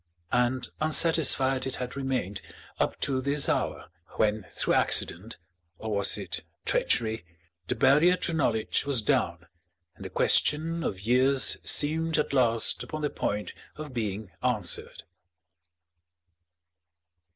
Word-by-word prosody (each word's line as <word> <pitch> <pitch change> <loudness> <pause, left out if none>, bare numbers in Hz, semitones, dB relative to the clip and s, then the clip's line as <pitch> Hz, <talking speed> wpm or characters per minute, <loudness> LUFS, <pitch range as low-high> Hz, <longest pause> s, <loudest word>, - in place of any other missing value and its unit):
And 125 +1 +1
unsatisfied 150 -4 +2
it 130 - -3
had 125 +1 -5
remained 130 -8 -3 0.4
up - - 0
to 130 -2 +1
this 140 +2 +2
hour, - - -2 0.3
when 105 -2 +1
through - - -1
accident 100 +6 +1 0.4
or 110 -1 -4
was 100 - 0
it - - -5 0.2
treachery 110 -4 0 0.4
the - - -1
barrier 160 +7 +4
to 170 - -1
knowledge 115 -8 0
was 140 -6 +1
down 90 - 0 0.5
and - - -12
the - - -6
question 165 +2 +2
of 95 - -3
years 130 +5 +3
seemed 160 +2 +2
at 150 - -1
last 115 -4 +2
upon 155 0 -6
the 150 - 0
point 105 0 -3 0.2
of 150 -3 -8
being 105 -4 -4
answered. 110 -9 -1
130 Hz, 125 wpm, -27 LUFS, 110-150 Hz, 0.5 s, barrier